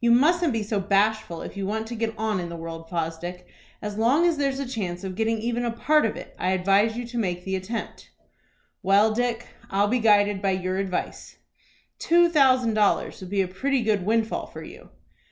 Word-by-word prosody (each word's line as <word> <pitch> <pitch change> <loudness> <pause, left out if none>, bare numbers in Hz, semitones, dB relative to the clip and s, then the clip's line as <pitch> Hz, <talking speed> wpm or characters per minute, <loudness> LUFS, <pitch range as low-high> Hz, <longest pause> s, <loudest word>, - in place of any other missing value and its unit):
"You 235 - +4
mustn't 315 +7 +4
be 225 -2 -1
so 210 0 -1
bashful 200 -2 0
if - - -8
you 195 -1 -3
want 220 +2 -2
to 235 +1 -6
get 225 0 -2
on 215 -3 -1
in 175 -1 -4
the 170 - -6
world, 165 0 -8
Fosdick. 175 +1 -4 0.4
As 210 0 -4
long 265 +10 +3
as 340 -3 +2
there's 275 -1 0
a 275 - -2
chance 195 -7 -4
of 190 -1 -4
getting 225 +3 0
even 235 +2 -2
a 240 - 0
part 275 +4 +2
of - - -4
it, - - -10
I 185 +1 +1
advise 195 +4 +2
you 245 - -4
to 235 0 -4
make 180 -4 -2
the 190 0 -1
attempt." 195 +5 -6 0.7
"Well, 205 +3 +4
Dick, 240 0 -1 0.2
I'll 200 +1 +2
be 250 +2 +1
guided 205 -3 +3
by 195 -1 +1
your 185 0 -2
advice." 190 -2 -4 0.6
"Two 345 +1 +4
thousand 260 -7 +4
dollars 210 -2 +1
would 185 - -8
be 200 0 +1
a - - -4
pretty 260 +8 -1
good 210 -4 +1
windfall 225 +2 0
for - - -10
you." - - -12
215 Hz, 210 wpm, -25 LUFS, 190-235 Hz, 0.7 s, You